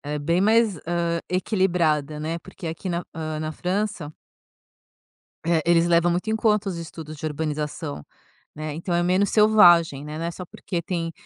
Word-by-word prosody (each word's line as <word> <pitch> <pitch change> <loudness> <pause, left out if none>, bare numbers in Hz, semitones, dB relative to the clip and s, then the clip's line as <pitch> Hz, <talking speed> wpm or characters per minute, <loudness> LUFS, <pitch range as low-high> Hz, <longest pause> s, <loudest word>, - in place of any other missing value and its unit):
Ela 145 +1 -5
é - - -2
bem 170 +5 +1
mais, 220 -2 +3
hã, 170 -1 0
equilibrada, 170 -6 0
né, 160 +2 -3
porque 185 -1 -9
aqui 165 +4 -5
na 175 0 -1
hã, 155 -1 -4
na 155 - -3
França 180 -2 -3 1.3
eh, 165 -2 +2
eles 170 0 +4
levam 170 0 +3
muito 180 +6 -1
em 220 - +1
conta 210 -2 +1
os 175 - -4
estudos 160 -2 -8
de 155 - -6
urbanização, 150 - -4 0.5
né. 155 0 -5
Então, 170 +3 -4
é 175 - +2
menos 185 +3 +2
selvagem, 175 -9 +5
né. 150 +1 -6
Não 165 - -3
é 170 - -2
só 180 +1 -8
porque 170 0 -5
tem, 165 -1 -3
170 Hz, 180 wpm, -24 LUFS, 155-185 Hz, 1.3 s, selvagem